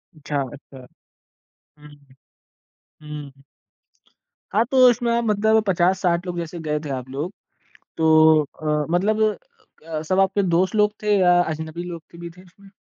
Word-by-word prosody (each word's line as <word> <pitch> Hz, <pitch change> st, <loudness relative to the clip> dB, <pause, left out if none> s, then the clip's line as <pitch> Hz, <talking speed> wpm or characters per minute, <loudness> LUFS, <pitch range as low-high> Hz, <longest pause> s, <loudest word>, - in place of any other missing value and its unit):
अच्छा, 150 Hz, -2 st, -3 dB
अच्छा। 135 Hz, -2 st, -14 dB, 0.9 s
हुँ, 150 Hz, 0 st, -15 dB, 0.9 s
हुँ, 150 Hz, -1 st, -11 dB
हुँ। 135 Hz, 0 st, -24 dB, 1.1 s
हाँ, 220 Hz, +3 st, +3 dB
तो 265 Hz, -, +1 dB
उसमें 235 Hz, -1 st, +1 dB
मतलब 220 Hz, 0 st, +2 dB
50-60 180 Hz, -1 st, +1 dB
लोग 180 Hz, -1 st, -5 dB
जैसे 170 Hz, +1 st, -6 dB
गए 150 Hz, 0 st, 0 dB
थे -, -, -5 dB
आप 130 Hz, -2 st, -5 dB
लोग, 145 Hz, +8 st, -5 dB, 0.6 s
तो 160 Hz, -1 st, +5 dB
अ, 150 Hz, +1 st, -3 dB
मतलब 205 Hz, +5 st, +1 dB, 0.7 s
अ, 155 Hz, -2 st, -4 dB
सब 185 Hz, +4 st, 0 dB
आपके 195 Hz, +1 st, +2 dB
दोस्त 185 Hz, +2 st, +1 dB
लोग 210 Hz, -1 st, +3 dB
थे 210 Hz, -1 st, +2 dB
या 180 Hz, -1 st, +4 dB
अजनबी 160 Hz, +1 st, -5 dB
लोग 170 Hz, -2 st, -7 dB
थे 170 Hz, -, -13 dB
भी 170 Hz, 0 st, -8 dB
थे 180 Hz, +2 st, -17 dB
उसमें? 195 Hz, +2 st, -20 dB
170 Hz, 150 wpm, -22 LUFS, 155-195 Hz, 1.1 s, तो